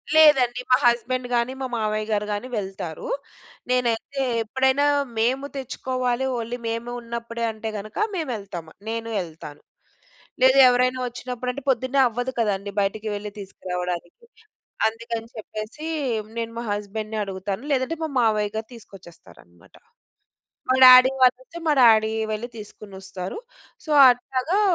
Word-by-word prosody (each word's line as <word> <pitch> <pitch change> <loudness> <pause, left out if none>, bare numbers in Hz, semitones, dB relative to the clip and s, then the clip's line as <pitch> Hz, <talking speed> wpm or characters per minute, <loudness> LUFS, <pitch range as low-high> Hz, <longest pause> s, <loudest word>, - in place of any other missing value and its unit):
లేదండి. 265 -6 +6
మా 255 - +6
హస్బండ్ 245 +1 +1
గానీ, 240 +2 +1
మా 260 - -1
మామయ్య 215 -1 -1
గారు 210 0 0
గానీ 205 +5 -4
వెళ్తారు. 195 - -5 0.6
నేనైతే 250 +2 0 0.2
ఎప్పుడైనా 265 +5 +2 0.3
మేము 260 +5 +1
తెచ్చుకోవాలి, 255 -1 -2
ఓన్లీ 235 +1 -4
మేము 230 +1 -4
ఉన్నప్పుడే 235 0 -5
అంటే 220 0 -6
గనక 210 +2 -8 0.2
మేవెళ్తామ. 205 - -4 0.2
నేను 230 0 -3
యెళ్తాను. 160 -4 -8 0.8
లేదా, 260 +1 +6
ఎవరైనా 255 +1 +2
ఒచ్చినప్పుడంటే, 250 +2 -5
పొద్దున్నే 260 +2 +1
అవ్వదు 245 +3 -3
కదండీ 200 -2 -1
బయటకి 205 +2 -1
వెళ్లి 205 0 -6
తీసుకురావడానికి. 180 - -5 0.6
అందుకని 230 0 -5
చెప్పేసీ 215 +8 -7 0.5
నేను 230 0 -3
మా 235 - -3
హస్బండ్‌ని 215 +1 -4
అడుగుతాను. 195 +2 -4
లేదంటే, 270 +4 0
మా 315 - -2
మావయ్య 215 -2 +1
గారు 220 0 -4
తీసుకొచ్చేస్తారనమాట. 165 - -16 0.9
మా 255 - +4
డాడీ 255 +1 +9
వాళ్ళయితే, 260 +6 +2
మా 300 - +4
డాడీయే 220 -1 +5
వెళ్లి 235 +3 -4
తీసుకునొస్తారు. 195 - -8 0.5
సో, - - -10 0.2
అట్లాగా 260 +9 -1
230 Hz, 120 wpm, -24 LUFS, 210-255 Hz, 0.9 s, డాడీ